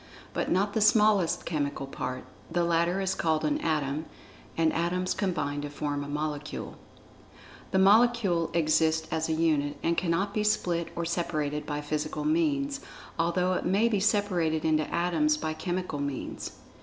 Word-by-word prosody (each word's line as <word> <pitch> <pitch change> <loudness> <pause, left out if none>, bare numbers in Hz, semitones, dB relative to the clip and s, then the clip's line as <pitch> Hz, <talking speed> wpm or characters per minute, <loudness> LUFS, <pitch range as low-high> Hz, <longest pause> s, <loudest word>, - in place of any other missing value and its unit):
(But - - -1
not 200 +3 +1
the 220 - +1
smallest 210 -4 +4
chemical 145 -3 -2
part—the 130 +6 -4
latter 170 +2 +1
is 190 -1 0
called 160 -3 0
an 150 -1 +1
Atom, 150 -1 -1 0.5
and 165 -1 +3
Atoms 180 +2 0
combine 150 -7 -1
to 145 - -5
form 145 0 -3
a - - -7
Molecule.) 150 0 -4 0.9
The - - +1
Molecule 200 -4 +4
exists 160 0 +2
as 160 0 -1
a - - +2
unit, 155 -3 +1
and 170 0 +2
cannot 185 +4 0
be 215 - 0
split 175 -5 +1
or 170 -1 -2
separated 150 -3 -2
by 145 0 -2
physical 155 - -3
means, 290 -3 +1 0.4
although 180 +2 +1
it - - -1
may 200 +5 +3
be 215 -4 +1
separated 185 -7 +1
into 155 -1 +1
Atoms 300 - +2
by 155 - -2
chemical 175 -2 -3
means. 140 -2 -4
170 Hz, 155 wpm, -28 LUFS, 155-190 Hz, 0.9 s, smallest